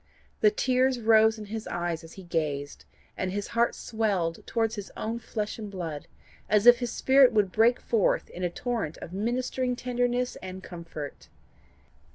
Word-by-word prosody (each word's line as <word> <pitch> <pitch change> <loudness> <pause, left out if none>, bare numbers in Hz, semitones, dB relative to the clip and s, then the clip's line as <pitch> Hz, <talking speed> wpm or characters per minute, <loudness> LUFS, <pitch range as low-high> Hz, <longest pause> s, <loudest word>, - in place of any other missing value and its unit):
The 430 - +6
tears 260 - +1
rose 220 0 +5
in 215 - -7
his 220 +1 -6
eyes 170 -2 -3
as 165 - -12
he 190 - -11
gazed, 150 -4 -3 0.3
and 185 -1 -2
his 200 +1 -3
heart 235 0 +1
swelled 200 -7 -1
towards 225 -1 0
his 205 -2 -6
own 230 +2 -3
flesh 215 -1 -4
and 210 -2 -6
blood, 165 -6 -5 0.4
as 210 0 +3
if 240 0 +9
his 245 -2 -2
spirit 265 -1 +5
would 205 -4 +2
break 235 +4 +4
forth 225 -4 +1
in 180 - -6
a 175 - +1
torrent 220 -4 -3
of 175 - -9
ministering 250 +4 -1
tenderness 245 0 -1
and 185 0 -8
comfort. 165 -5 -8
220 Hz, 170 wpm, -27 LUFS, 180-240 Hz, 0.4 s, if